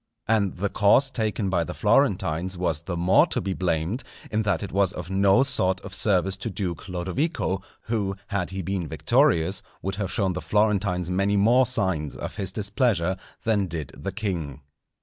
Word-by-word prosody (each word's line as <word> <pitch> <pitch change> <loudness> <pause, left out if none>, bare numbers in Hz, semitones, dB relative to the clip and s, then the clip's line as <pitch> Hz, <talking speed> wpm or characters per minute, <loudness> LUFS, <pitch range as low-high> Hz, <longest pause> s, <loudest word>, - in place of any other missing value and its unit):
And 105 -4 +2
the 100 +3 -2
course 120 +8 +4
taken 110 -4 -1
by 85 -3 +2
the - - -6
Florentines 90 +4 +1
was 85 -4 -1
the 85 +1 -4
more 90 +2 +4
to - - 0
be 95 +1 -2
blamed 90 +6 -1 0.3
in 110 -1 +1
that 105 -1 0
it 100 - -6
was 100 -1 +2
of 90 +1 -7
no 100 +6 +4
sort 95 -9 +1
of 95 - -9
service 95 -2 +2
to 115 - -4
Duke 95 -2 -4
Lodovico, 95 - -1 0.2
who, 105 -4 -2
had 100 -3 -1
he 95 0 -4
been 95 -1 -2
victorious, 85 +6 +2 0.2
would 95 +1 -3
have 100 -3 -2
shown 95 -1 +1
the 90 - -4
Florentines 100 -4 +1
many 100 +2 +1
more 120 +5 +4
signs 95 - 0
of - - -6
his 95 - -1
displeasure 100 -4 0 0.3
than 105 -4 +1
did 80 -5 -5
the 100 - -5
king. 85 -9 -4
95 Hz, 180 wpm, -25 LUFS, 90-105 Hz, 0.3 s, course